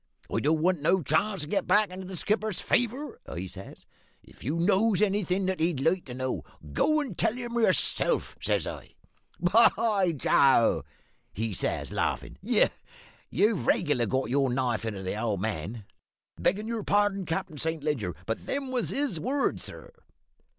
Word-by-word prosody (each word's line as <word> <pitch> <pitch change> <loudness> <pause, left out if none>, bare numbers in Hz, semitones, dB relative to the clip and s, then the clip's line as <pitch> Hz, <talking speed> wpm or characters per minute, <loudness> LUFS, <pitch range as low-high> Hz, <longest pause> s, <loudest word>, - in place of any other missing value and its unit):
"`I - - 0
don't 155 +2 +2
want 180 -3 +2
no 180 +4 +2
chance 185 +7 +1
to 150 - -4
get 195 +3 -1
back 210 -2 +4
into 185 0 -7
the 185 -1 -6
skipper's 215 +1 0
favour,' 245 +5 -1
I 90 - -5
says. 95 +1 -10 0.4
`If - - -17
you 145 +7 -2
knows 195 +3 +3
anything 195 -2 +1
that 190 0 -1
he'd 165 -3 +1
like 170 +6 +1
to 125 - -7
know, 130 0 -3 0.3
go 310 - +3
and 255 -11 -5
tell - - +2
him 240 -1 -5
yourself,' 235 - +1
says - - +1
I. - - -8 0.4
"`Why, 195 -2 +3
Joe,' 120 - +4 0.5
he 110 +1 -2
says, - - -2
laughin', - - -2
`you've 195 - 0
regular 145 -8 +2
got 130 -1 -1
your 135 -1 +2
knife 120 -3 0
into 100 -4 -4
the 95 +3 -3
old 110 -5 0
man,' 105 +1 -4 0.6
beggin' 205 +4 +1
your 230 -1 -2
pardon, 205 -1 +2
Cap'n 160 -3 -3
Saint 160 -1 -2
Leger, 130 - -1
but 115 - -4
them 275 -2 -2
was 250 -2 -1
his 275 - -1
words, 270 - -1
sir." - - -8
175 Hz, 165 wpm, -28 LUFS, 130-210 Hz, 0.6 s, back